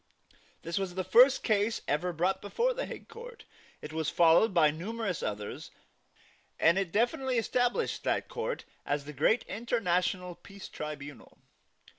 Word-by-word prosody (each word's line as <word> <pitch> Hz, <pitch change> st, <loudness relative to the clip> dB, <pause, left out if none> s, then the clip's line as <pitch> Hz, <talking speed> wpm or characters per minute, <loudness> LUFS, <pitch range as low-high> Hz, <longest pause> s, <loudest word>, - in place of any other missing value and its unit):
This 170 Hz, +3 st, -2 dB
was 185 Hz, -2 st, -4 dB
the 190 Hz, -, -1 dB
first 245 Hz, +9 st, +6 dB
case 215 Hz, 0 st, +1 dB
ever 170 Hz, +5 st, 0 dB
brought 180 Hz, +3 st, 0 dB
before 475 Hz, -, 0 dB
the -, -, -4 dB
Hague -, -, -9 dB
Court. 475 Hz, +1 st, -11 dB, 0.4 s
It 155 Hz, -, -7 dB
was 160 Hz, -2 st, -1 dB
followed 170 Hz, +6 st, +5 dB
by 160 Hz, -5 st, +4 dB
numerous 195 Hz, +3 st, -4 dB
others; 105 Hz, 0 st, -5 dB, 0.9 s
and 170 Hz, +4 st, +4 dB
it 190 Hz, -4 st, -2 dB
definitely 245 Hz, +4 st, +1 dB
established 245 Hz, +1 st, 0 dB
that -, -, 0 dB
court 485 Hz, +1 st, -4 dB, 0.2 s
as 145 Hz, 0 st, -2 dB
the 150 Hz, -, -8 dB
great 155 Hz, -, +2 dB
international 185 Hz, -5 st, -1 dB
peace 200 Hz, +2 st, -12 dB
tribunal. 145 Hz, -2 st, -8 dB
190 Hz, 145 wpm, -30 LUFS, 165-235 Hz, 0.9 s, first